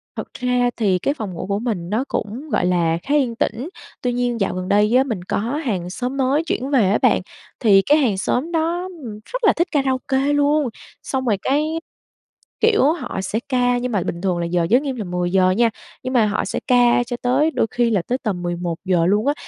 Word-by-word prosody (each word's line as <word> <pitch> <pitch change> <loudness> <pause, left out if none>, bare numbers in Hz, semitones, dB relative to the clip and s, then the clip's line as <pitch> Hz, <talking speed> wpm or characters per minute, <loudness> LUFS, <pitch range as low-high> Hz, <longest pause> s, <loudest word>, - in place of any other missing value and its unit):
Thật - - -7
ra 250 -1 +1
thì 195 -5 +2
cái 280 - 0
phòng 215 -10 -6
ngủ 170 - -5
của 200 0 -1
mình 210 -8 -3
nó 220 +6 0
cũng, 245 +9 -4
gọi 185 - +1
là, 170 -2 +2
khá 285 - 0
yên 255 -6 +1
tĩnh. 235 +6 -2 0.3
Tuy 250 -1 0
nhiên 245 -1 -1
dạo 195 - +1
gần 185 0 -4
đây 210 +3 +3
á 260 - +6
mình 225 -10 -4
có - - -2
hàng 225 - -2
xóm 250 +7 -4
mới 275 +4 +2
chuyển 275 -5 -2
về 245 -9 +3
á 205 - +3
bạn, - - +4 0.4
thì 200 -4 +5
cái 290 +9 +3
hàng 240 -10 +1
xóm 255 - -1
đó, 340 +2 -1 0.2
ừm, 215 -3 -7
rất - - -6
là 430 - +5
thích 345 +2 +1
karaoke 265 -2 0
luôn, 290 -1 +2 0.3
xong 260 -1 -2
rồi 215 -5 +2
cái, 305 +4 0 0.8
kiểu, 440 -1 +4
họ 250 - -5
sẽ 205 +3 -2
ca 245 -2 +2
nhưng 250 0 -2
mà 200 -5 0
bình 170 - -4
thường 185 -2 0
là 170 - -1
giờ 170 0 0
giới 250 +3 +5
nghiêm 275 -3 -3
là 225 - -4
10:00 180 +1 +1
nha, 230 +5 +3 0.3
nhưng 255 - -3
mà 235 -4 +4
họ 210 0 -1
sẽ - - -3
ca 245 -1 +4
cho 245 0 -5
tới 270 +6 +2
đôi 225 - 0
khi 240 -1 +1
là 200 -4 +2
tới 250 - 0
tầm 195 -6 -2
11:00 175 0 -1
luôn 205 +7 +2
á. 285 - +3
240 Hz, 230 wpm, -21 LUFS, 195-270 Hz, 0.8 s, á